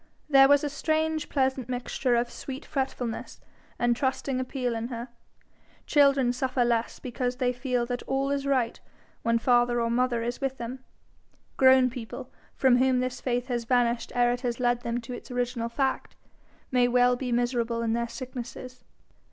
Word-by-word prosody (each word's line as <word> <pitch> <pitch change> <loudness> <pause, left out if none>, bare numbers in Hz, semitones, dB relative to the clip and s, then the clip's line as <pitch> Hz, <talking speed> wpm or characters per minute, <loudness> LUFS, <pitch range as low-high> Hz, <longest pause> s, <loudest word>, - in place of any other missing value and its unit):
There 270 -2 +7
was 285 +1 +5
a - - 0
strange 315 +1 -1
pleasant 265 -3 0
mixture 250 0 -1
of 240 0 0
sweet 270 +2 -7
fretfulness 260 -4 -3 0.4
and 240 0 +2
trusting 265 0 -1
appeal 255 -1 -2
in 225 0 -3
her. 240 0 -6 0.8
Children 275 -4 +4
suffer 255 0 0
less 235 -1 0
because 250 0 -3
they 250 -1 0
feel 250 -1 -1
that 245 0 -3
all 270 +1 0
is 280 0 -1
right 255 -4 +1 0.4
when 230 0 +2
father 240 0 +3
or 230 0 0
mother 240 -1 +1
is 240 +3 -4
with 270 -1 -2
them; 245 +2 -6 0.7
grown 260 -1 +5
people 245 0 -8 0.2
from 260 -2 +4
whom 255 0 +3
this 255 0 -3
faith 245 -1 -1
has 240 -3 -2
vanished 240 -1 +1
ere 245 0 +4
it 245 0 -2
has 240 -2 -2
led 245 -1 +1
them 235 0 -2
to 235 +2 -8
its - - -9
original 245 -1 -2
fact, 265 +2 -2 0.6
may 250 -1 +4
well 245 0 +4
be 250 0 -4
miserable 235 -1 0
in 225 -1 0
their 235 0 -1
sicknesses. 255 +1 -8
250 Hz, 170 wpm, -27 LUFS, 240-265 Hz, 0.8 s, There